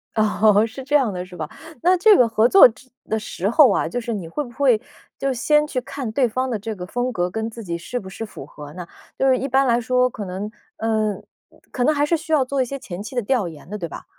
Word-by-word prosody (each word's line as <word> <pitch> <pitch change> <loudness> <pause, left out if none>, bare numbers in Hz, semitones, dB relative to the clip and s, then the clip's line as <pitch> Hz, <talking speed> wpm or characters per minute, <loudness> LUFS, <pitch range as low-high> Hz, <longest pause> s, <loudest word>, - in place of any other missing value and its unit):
哦， 215 -1 +4
是 255 +4 -9
这 285 +3 0
样 260 -7 +3
的 180 -1 -5
是 180 -1 -13
吧？ 155 -3 -5 0.3
那 365 +2 +4
这 420 +3 +6
个 245 - +5
合 225 0 +3
作 385 +1 +9
之 255 +3 -17 0.2
的 220 - 0
时 200 -2 -3
候 260 -1 +6
啊， - - +1
就 245 - -2
是 235 -1 -4
你 190 -6 -5
会 295 - -3
不 240 - -11
会 245 -3 +3 0.4
就 275 -1 -1
先 300 +4 +2
去 255 -4 -3
看 260 -2 -5
对 250 +3 +2
方 255 +3 -1
的 230 - -1
这 220 +2 -5
个 180 -2 -7
风 245 +5 -2
格 180 -5 -1
跟 220 +1 -3
自 230 0 -9
己 170 -3 -3
是 245 +9 -5
不 190 - -11
是 225 - -7
符 190 -9 -10
合 145 0 -11
呢？ 175 -1 -8 0.3
就 270 - +2
是 260 -1 +4
一 270 - -3
般 270 +1 +3
来 240 -1 +2
说， 250 +1 +2
可 215 - -7
能 195 +3 -5 0.3
呃， 215 -2 0 0.6
可 250 - -1
能 305 +5 +3
还 290 - +2
是 335 +3 +2
需 320 0 -7
要 280 -4 +4
做 275 +1 -1
一 255 - +1
些 275 +3 -5
前 190 -7 -8
期 215 +5 -8
的 245 - +1
调 235 -4 +1
研 160 -2 -11
的， 210 - -4
对 170 -4 -5
吧？ - - -9
235 Hz, 290 characters per minute, -22 LUFS, 205-265 Hz, 0.6 s, 作